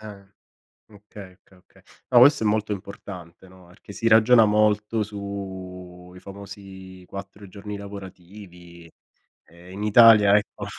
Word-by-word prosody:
ehm, 100 -2 -13 0.6
okay, 100 -2 -14
okay, 95 +1 -26
okay. - - -26 0.3
No, 120 - +6
questo 140 -1 +5
è - - +1
molto 105 0 -1
importante, 95 -2 -10
no, 95 0 -19
perché 90 +3 -16
si 115 - -3
ragiona 115 +1 +5
molto 105 +1 0
su 95 -3 -9
i 90 - -12
famosi 95 -2 -12
4 100 +1 -11
giorni 100 +2 -9
lavorativi. 90 -3 -13 0.6
Ehm, 85 +2 -17
in 100 +2 -7
Italia 105 -2 +6
ecco, 105 - -5
100 Hz, 135 wpm, -23 LUFS, 90-105 Hz, 0.6 s, No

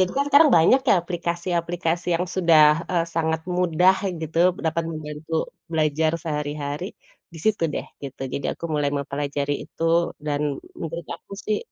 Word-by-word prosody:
itu 185 - +3
kan 280 - +2
sekarang 300 +2 +8
banyak 255 +12 +5
ya - - +7
aplikasi-aplikasi 170 0 -2
yang 180 - -1
sudah, 170 -4 +5 0.2
eee, 170 -2 +2
sangat 160 -1 0 0.2
mudah 180 +1 +4 0.3
gitu, 160 +1 -3 0.3
dapat 165 +1 0
membantu 155 0 -6 0.4
belajar 155 0 +1
sehari-hari, 150 +2 -4 0.4
di 165 - -10
situ 215 -5 +1
deh, - - -3 0.2
gitu, 135 -1 -8
jadi 140 - -2
aku - - -11
mulai 145 -1 +1
mempelajari 140 0 -2
itu - - -9 0.4
dan 145 -1 0 0.4
menurut 165 +1 -5
aku - - -15
sih, 215 -1 +1
165 Hz, 150 wpm, -23 LUFS, 150-175 Hz, 0.4 s, sekarang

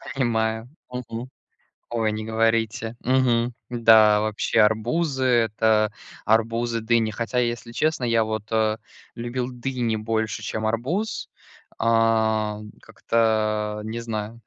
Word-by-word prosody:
Понимаю. 110 -2 0 0.2
Мгм. 125 0 -6 0.6
Ой, 115 -2 0
не 110 0 -4
говорите. 115 +1 0
Мгм. 125 -2 +2 0.2
Да, 110 -3 +5
вообще 110 +1 0
арбузы- 130 +7 +1
это 110 -3 +2 0.3
арбузы, 115 +1 +1
дыни. 110 -1 +2
Хотя, 115 +3 -2
если 120 -1 -2
честно, 155 +1 0
я 115 -1 +3
вот, 110 -1 -4
э, 110 -1 +1 0.4
любил 120 +1 -3
дыни 125 -2 -2
больше, 110 0 -2
чем 110 0 -3
арбуз. 135 - -2 0.5
А, 110 -2 +2 0.2
как-то 110 -2 0
не 115 +2 -4
знаю, 115 0 -5
115 Hz, 110 wpm, -24 LUFS, 110-120 Hz, 0.6 s, Да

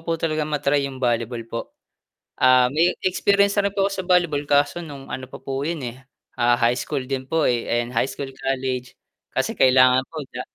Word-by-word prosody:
po 165 - 0
talagang 155 -2 -1
ma-try 145 -1 0
'yung 135 - -9
volleyball 120 -1 -1
po, 115 0 -5 0.8
ah, 130 0 +5
may 170 +3 +2
experience 200 +2 +3
na 200 - 0
rin 200 - -18
po 195 - +3
ako 200 - -1
sa - - -12
volleyball 175 -5 +2
kaso 145 +4 +2
nung 140 -5 -9
ano 130 0 -6
pa - - -9
po 135 +1 -4
'yun 155 0 -3
eh, 125 +2 -7 0.4
ah, 120 0 +4
high 120 -1 +3
school 130 - -3
din 130 0 -4
po 160 -1 +1
eh, 120 -1 0
ayan, 120 +1 -1
high 125 +3 +1
school 135 -1 -6
college 130 -2 -3 0.3
kasi - - -1
kailangan 130 0 +5
po. 155 -3 -6
Opo - - -37
sa 125 - -4
135 Hz, 210 wpm, -22 LUFS, 125-155 Hz, 0.8 s, ah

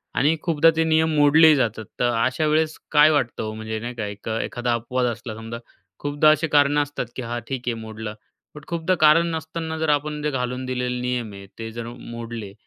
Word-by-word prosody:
आणि 150 +4 +3
खूपदा 165 -1 +4
ते 160 - +2
नियम 160 0 +2
मोडलेही 150 +2 +7
जातात. 115 -5 -1
तर 120 - +2
अशा 130 +4 0
वेळेस 155 +1 +1
काय 150 0 +7
वाटतं 140 -8 0
ओ 110 0 -4
म्हणजे 110 0 -5
नाही 120 +2 -5
का 110 -3 -3
एक 100 +1 -8
एखादा 120 0 -2
अपवाद 125 +2 -1
असला 110 0 -7
समजा 115 +1 -7 0.4
खूपदा 145 +1 +3
असे 155 +2 +1
कारणं 145 0 +4
असतात 145 -3 -5
की - - -4
हा 120 0 -4
ठीक 135 -2 -3
आहे 120 - +1
मोडलं. 110 -1 -6 0.4
पण 150 - -10
खूपदा 170 +2 0
कारण 155 +2 +6
नसताना 160 0 -5
जर 160 -1 0
आपण 150 0 0
ते 150 - +1
घालून 125 -1 -3
दिलेले 125 -1 -2
नियम 125 -3 -2
आहे 100 0 -10
ते 115 0 -5
जर 115 +1 -6
म 120 - -8 0.2
मोडले 115 -3 -7
130 Hz, 210 wpm, -23 LUFS, 115-155 Hz, 0.4 s, मोडलेही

